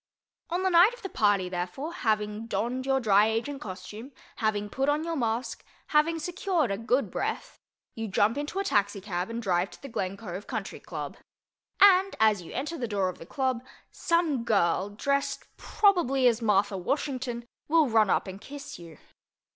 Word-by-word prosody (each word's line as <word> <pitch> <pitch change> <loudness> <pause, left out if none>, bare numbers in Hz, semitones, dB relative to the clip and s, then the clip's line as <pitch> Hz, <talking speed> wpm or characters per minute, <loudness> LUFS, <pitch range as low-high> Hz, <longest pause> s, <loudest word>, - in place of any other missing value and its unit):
On 355 +3 -1
the 375 - +2
night 360 +8 +6
of - - -18
the 390 - -4
party, 205 - +2
therefore, 180 - -4
having 215 -3 -1
donned 240 +5 -2
your 270 0 +3
Dry 210 -3 +4
Agent 235 +6 -2
costume, 210 +6 -8 0.3
having 210 -2 0
put 270 +7 -1
on 295 +2 +1
your 335 0 -2
mask, 235 -2 -2 0.3
having 315 +2 +3
secured 345 - -1
a 195 - -1
good 250 +4 0
breath—you 225 -1 -6
jump 205 +3 +2
into 295 +6 -4
a 395 - +1
taxicab 200 - -1
and 230 +1 -4
drive 180 -1 +1
to - - -14
the - - -6
Glen 195 -6 -3
Cove 195 -2 -7
Country - - -5
Club. - - -6 0.6
And, 390 -1 +6
as 215 -3 +4
you 170 - -11
enter 305 +5 -4
the 240 - -2
door 200 -3 0
of 185 - -8
the 165 - -11
club, 260 -1 -1 0.3
some 330 -7 +1
girl, 195 -3 +2
dressed, 280 +7 -1
probably, 305 - +3
as 235 -1 +2
Martha 205 -2 +2
Washington, 250 +1 -2 0.2
will 320 -1 +4
run 220 -3 +3
up - - +2
and 190 +1 -8
kiss 280 -3 -9
you. 165 -3 -12
235 Hz, 175 wpm, -28 LUFS, 205-290 Hz, 0.6 s, night